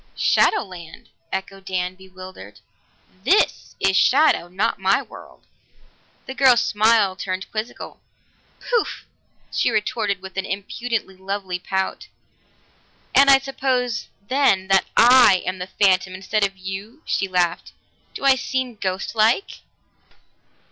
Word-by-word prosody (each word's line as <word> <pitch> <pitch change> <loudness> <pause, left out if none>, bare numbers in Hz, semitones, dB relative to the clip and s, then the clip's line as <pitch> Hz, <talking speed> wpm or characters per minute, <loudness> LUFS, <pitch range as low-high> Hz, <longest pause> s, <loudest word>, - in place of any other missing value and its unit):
"Shadow 425 - +2
land?" 175 -5 -12 0.2
echoed 190 0 -5
Dan, 180 -1 -2
bewildered. 185 - -13 0.6
"This 400 - +1
is 190 - +2
shadow, 275 - +3
not 195 +6 -2
my 195 +1 +2
world." - - -15 0.8
The 265 - -6
girl's 260 -3 +4
smile 215 -2 +2
turned 185 -1 -5
quizzical. 220 +2 -6 0.6
"Poof!" 475 -3 -2 0.5
she - - +1
retorted 210 -2 -1
with 190 0 -11
an 195 - -1
impudently 205 +1 -4
lovely 190 -1 -4
pout. 190 +1 -3 1.1
"And 275 0 +6
I 270 - +8
suppose, 260 -3 -2 0.2
then, 255 -8 +2
that 195 -1 +4
I 240 -6 +6
am 185 +1 -3
the 180 - -5
phantom 185 -1 +1
instead 200 +3 -1
of 195 -1 -1
you!" 195 - -8
She 195 - -1
laughed. 180 -2 -1 0.4
"Do - - -5
I 270 - +7
seem 255 -2 -3
ghostlike?" 215 - 0
195 Hz, 120 wpm, -21 LUFS, 185-245 Hz, 1.1 s, I